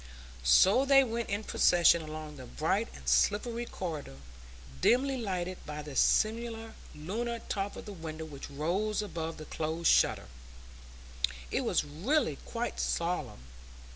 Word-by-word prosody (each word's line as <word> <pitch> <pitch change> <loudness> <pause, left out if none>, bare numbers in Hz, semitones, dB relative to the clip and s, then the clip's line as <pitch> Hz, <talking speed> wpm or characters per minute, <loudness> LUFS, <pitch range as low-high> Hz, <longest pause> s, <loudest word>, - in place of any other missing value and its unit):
So 190 - +6
they 275 0 +6
went 235 -1 -3
in 205 +2 -2
procession 170 -4 +4
along 155 -1 -7
the - - -9
bright - - 0
and 65 -1 -13
slippery 230 - +2
corridor, 155 - -5 0.6
dimly 265 +3 +3
lighted 185 -6 -3
by 150 0 -5
the 145 -2 -8
semi 225 - +3 0.5
lunar 225 +10 -3
top 200 0 -2
of - - -9
the 205 - -7
window 160 -2 -6
which 140 -3 -9
rose 185 +9 -1
above 165 -5 -5
the 155 - -8
closed 160 +2 0
shutter; - - +3 1.3
it - - +1
was - - +1
really 160 - 0
quite 235 0 -3
solemn. 160 - -2
175 Hz, 140 wpm, -31 LUFS, 155-225 Hz, 1.3 s, So